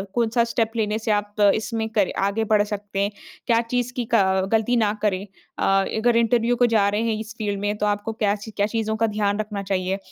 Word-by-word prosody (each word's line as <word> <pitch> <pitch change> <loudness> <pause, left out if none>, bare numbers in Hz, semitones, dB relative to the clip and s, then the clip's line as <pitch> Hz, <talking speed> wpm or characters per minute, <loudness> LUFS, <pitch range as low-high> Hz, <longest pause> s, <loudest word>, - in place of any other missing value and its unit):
कौन-सा 235 0 +2
स्टेप 225 -2 +1
लेने 215 -1 0
से 220 0 -1
आप 205 0 -1 0.2
इसमें 220 0 -2
करे 210 -4 +1 0.2
आगे 220 +3 -1
बढ़ 210 -1 +5
सकते 205 -1 -5
हैं, 200 +1 +1 0.4
क्या 230 -2 +4
चीज़ 245 +1 -2
की 245 -2 -3
क 190 -3 +3
गलती 225 +2 +2
ना 210 -2 +2
करें 200 -2 0 0.3
अ, - - -1 0.3
अगर 235 +2 +2
इंटरव्यू 235 +1 +2
को 245 - +3
जा 200 -2 +4
रहे 205 +2 -1
हैं 230 -1 0
इस 220 0 -7
फ़ील्ड 205 -2 -2
में, 205 +1 -1
तो 210 - -1
आपको 205 +2 -1
क्या 210 -2 +1
च 215 +1 -9
क्या 205 - +2
चीज़ों 220 0 -2
का 225 +1 +1
ध्यान 205 -1 -1
रखना 210 -1 -3
चाहिए। 190 0 -1
215 Hz, 225 wpm, -23 LUFS, 205-225 Hz, 0.4 s, बढ़